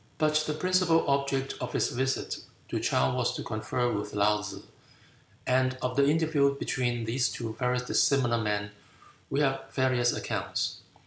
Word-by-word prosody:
But 155 -1 +2
the 150 - -1
principal 180 -1 +2
object 140 -1 0
of 125 - -4
his - - +1
visit 130 +2 -1 0.3
to - - -1
Chow 65 0 +1
was - - 0
to - - -4
confer 110 +3 -1
with 105 0 -4
Laou 105 +1 +3
tsze; 105 - -7 0.8
and 130 0 +2
of 125 -1 -2
the 140 0 +4
interview 150 -3 +2
between 120 -4 -1
these 120 +3 +1
two 115 -2 -5
very 125 0 +1
dissimilar 125 -1 +2
men 105 -1 -1 0.6
we 140 - +1
have 135 -1 -1
various 130 -2 +2
accounts. - - -2
130 Hz, 155 wpm, -29 LUFS, 115-140 Hz, 0.8 s, the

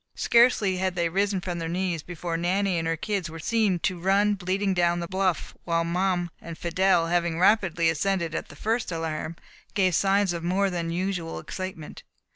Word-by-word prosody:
Scarcely 235 -6 +4
had 185 0 -1
they 170 -1 +1
risen 195 +2 0
from 175 -1 -4
their 165 -1 -3
knees, 175 -2 -1
before 175 0 -5
Nanny 180 +2 +1
and 165 - -2
her 165 0 0
kids 195 -2 -2
were 165 - -8
seen 210 +2 +1
to 185 -2 -1
run 200 +3 +3
bleating 195 +1 -1
down 175 -1 +2
the 170 - -4
bluff, 185 -2 -1
while 165 -1 +1
Mum 175 0 0
and 165 -1 -8
Fidelle, 175 0 +2
having 170 -1 0
rapidly 180 -3 +3
ascended 170 +1 0
at - - -3
the - - -12
first 225 +6 -1
alarm, 165 0 -3 0.4
gave 185 -3 +3
signs 195 +1 +2
of 170 -1 -5
more 190 +3 +1
than 170 -2 -2
usual 175 -1 -2
excitement. 185 -5 -7
180 Hz, 185 wpm, -26 LUFS, 170-195 Hz, 0.4 s, Scarcely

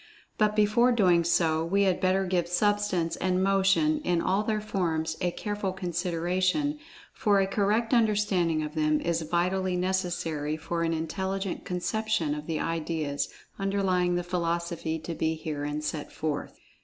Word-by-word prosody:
But 210 -1 +3
before 215 +4 +4
doing 180 -7 +4
so, 160 -1 +2
we 195 +4 +2
had 190 -2 +1
better 190 +1 +2
give 180 -2 0
Substance 190 -2 +1
and 185 0 +1
Motion, 195 +11 +3
in 175 -1 +1
all 190 +4 +1
their 215 0 -1
forms, 165 -6 -1
a 180 - +2
careful 205 +1 -3
consideration, 185 - -1 0.3
for 205 -2 +2
a 195 - +3
correct 210 +4 +1
understanding 205 -8 +2
of 150 0 -5
them 155 -1 +2
is 170 -1 -1
vitally 180 +3 0
necessary 175 -5 -1
for 170 +2 -3
an 165 0 +1
intelligent 190 +4 -3
conception 180 -2 -1
of 150 0 -6
the 160 -2 -1
ideas 160 -3 -2 0.3
underlying 190 -3 +1
the 175 - -1
philosophy 170 -2 -2
to 165 +1 -6
be 160 0 0
herein 150 -1 -4
set 150 0 -4
forth. 150 -2 -4
180 Hz, 150 wpm, -28 LUFS, 165-195 Hz, 0.3 s, before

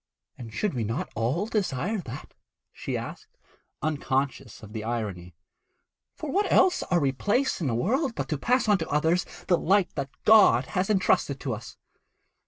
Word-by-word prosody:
'And 115 -3 -9
should 200 - -1
we 120 -3 -2
not 115 +3 -3
all 130 - 0
desire 205 - -1
that?' 135 -6 -8 0.4
she - - -4
asked, - - -9 0.5
unconscious 135 -5 -2
of 105 0 -11
the 110 -2 -4
irony. 100 -7 -4 0.8
'For 305 - -5
what 405 +5 +1
else 370 - +4
are 180 - +1
we 140 -3 +2
placed 205 - 0
in 155 - 0
the 115 - 0
world 250 - 0
but - - -3
to 150 - -1
pass 245 - +2
on 205 -2 +4
to 160 - -4
others 160 +5 +1 0.2
the 175 -3 +3
light 195 +1 +2
that 140 -1 -3 0.2
God 200 - +6
has 185 +2 0
entrusted 180 -8 +2
to 130 - -2
us?' 115 +1 -9
150 Hz, 175 wpm, -27 LUFS, -, 0.8 s, God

